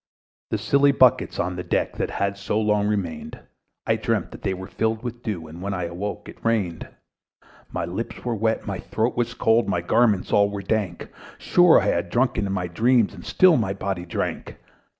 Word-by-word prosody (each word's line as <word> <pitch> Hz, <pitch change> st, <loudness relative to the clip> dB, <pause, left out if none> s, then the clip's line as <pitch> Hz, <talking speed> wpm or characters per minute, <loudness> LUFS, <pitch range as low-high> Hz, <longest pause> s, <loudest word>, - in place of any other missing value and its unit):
The -, -, 0 dB
silly 140 Hz, 0 st, +3 dB
buckets 130 Hz, -3 st, +3 dB
on 90 Hz, +1 st, -1 dB
the 90 Hz, -, -4 dB
deck, -, -, -1 dB
That -, -, -1 dB
had 100 Hz, 0 st, -1 dB
so 100 Hz, +2 st, -2 dB
long 105 Hz, -1 st, +1 dB
remained, 90 Hz, -7 st, -3 dB, 0.5 s
I -, -, +2 dB
dreamt -, -, -1 dB
that -, -, -11 dB
they 95 Hz, -, -1 dB
were 95 Hz, +1 st, -7 dB
filled 110 Hz, +3 st, -2 dB
with 120 Hz, -1 st, -6 dB
dew; 100 Hz, -8 st, -4 dB
And 80 Hz, +3 st, -10 dB
when 100 Hz, +1 st, -3 dB
I 90 Hz, -, -3 dB
awoke, 100 Hz, +5 st, -5 dB
it -, -, -13 dB
rained. 100 Hz, -8 st, -1 dB, 0.8 s
My -, -, -2 dB
lips 95 Hz, +10 st, -6 dB
were 120 Hz, -, 0 dB
wet, 110 Hz, +1 st, 0 dB
my 100 Hz, -3 st, -4 dB
throat 110 Hz, +6 st, -1 dB
was 120 Hz, -1 st, -1 dB
cold, 115 Hz, -1 st, +2 dB
My 90 Hz, -3 st, 0 dB
garments 105 Hz, +2 st, +2 dB
all 100 Hz, 0 st, +4 dB
were 100 Hz, -1 st, -5 dB
dank; 95 Hz, -4 st, -2 dB, 0.3 s
Sure 175 Hz, -2 st, +5 dB
I -, -, -2 dB
had 85 Hz, -3 st, 0 dB
drunken 120 Hz, -2 st, +1 dB
in -, -, -3 dB
my 95 Hz, -2 st, -1 dB
dreams, 115 Hz, +5 st, +2 dB
And 90 Hz, -3 st, -11 dB
still 185 Hz, -4 st, +5 dB
my 100 Hz, -4 st, 0 dB
body 95 Hz, -2 st, -4 dB
drank. -, -, -4 dB
100 Hz, 200 wpm, -23 LUFS, 90-115 Hz, 0.8 s, Sure